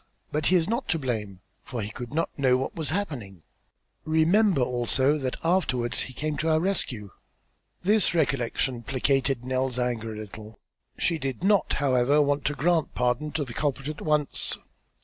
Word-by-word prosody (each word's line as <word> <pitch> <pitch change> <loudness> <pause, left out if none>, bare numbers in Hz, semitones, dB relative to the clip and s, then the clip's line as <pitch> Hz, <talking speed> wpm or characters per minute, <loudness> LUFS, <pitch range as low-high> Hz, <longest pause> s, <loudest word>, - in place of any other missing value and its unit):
But 150 0 0
he 185 - +4
is 165 -2 +3
not 235 +5 -1
to 165 - +2
blame, 105 - -3 0.2
for 120 -5 -5
he 105 - -5
could 120 +2 -7
not 165 +3 0
know 130 -3 +3
what 130 - -3
was 160 -4 -3
happening. 130 - -4 0.6
Remember 160 - +3
also 130 +4 +1
that 130 -2 -2
afterwards 155 -9 +1
he 130 - -4
came 150 +2 -2
to 160 - 0
our 155 0 +4
rescue." 130 - -1 0.7
This 205 -1 +4
recollection 130 -4 0
placated 135 0 0
Nell's 130 -1 -1
anger 120 -3 -1
a 110 - -7
little. 110 +1 -9 0.4
She 165 -2 0
did 135 +3 -4
not, 200 0 +3
however, 135 +1 +3
want 145 -1 +1
to 145 - 0
grant 160 +3 +1
pardon 125 +5 0
to 150 -2 -1
the 120 - -8
culprit 140 +1 -1
at 150 - -6
once. 150 -2 0
135 Hz, 170 wpm, -26 LUFS, 125-160 Hz, 0.7 s, he